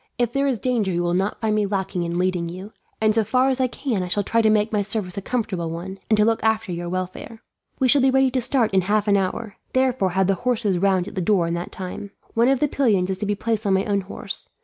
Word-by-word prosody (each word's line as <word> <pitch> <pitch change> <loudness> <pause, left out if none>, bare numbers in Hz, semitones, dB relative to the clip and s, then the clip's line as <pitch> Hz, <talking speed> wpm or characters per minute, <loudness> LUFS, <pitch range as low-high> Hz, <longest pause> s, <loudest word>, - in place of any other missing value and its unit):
If 240 -1 0
there 275 0 +1
is 260 -4 +1
danger 220 -3 0
you 175 0 0
will 175 0 0
not 190 +3 -1
find 220 -1 +1
me 210 -1 +1
lacking 195 -2 -2
in 170 0 -2
leading 180 -2 0
you, 185 +5 -9 0.3
and 215 0 +3
so 225 0 +2
far 255 +5 +2
as 260 0 0
I 255 - +3
can 245 -4 -2
I 180 - -3
shall 200 +3 0
try 230 +3 +2
to 220 - +3
make 215 +1 +2
my 210 - +2
service 200 -3 -3
a 200 - -3
comfortable 195 -7 -2
one, 180 +4 -6
and 215 - +4
to 210 - +4
look 225 0 +1
after 220 -2 +1
your 175 0 -4
welfare. 185 +5 -5 0.3
"We 260 - +2
shall 275 +2 +5
be 265 - +4
ready 265 0 +3
to 255 0 0
start 245 -4 +1
in 190 - +4
half 210 +3 0
an 205 - +4
hour, 200 +2 -2 0.2
therefore 255 -8 +1
have 190 +1 +2
the 195 - +2
horses 215 -3 0
round 190 -1 +2
at - - -8
the 190 - -2
door 180 -1 +2
in 170 - -2
that 170 +1 -4
time. 190 +2 -6 0.2
One 230 +1 +3
of 270 -1 +3
the 300 - +3
pillions 205 -10 +1
is 190 - -3
to 210 - -2
be 205 - 0
placed 220 0 -2
on 195 - +3
my 190 - +1
own 200 -2 0
horse. 190 - -6
205 Hz, 280 wpm, -23 LUFS, 185-230 Hz, 0.3 s, shall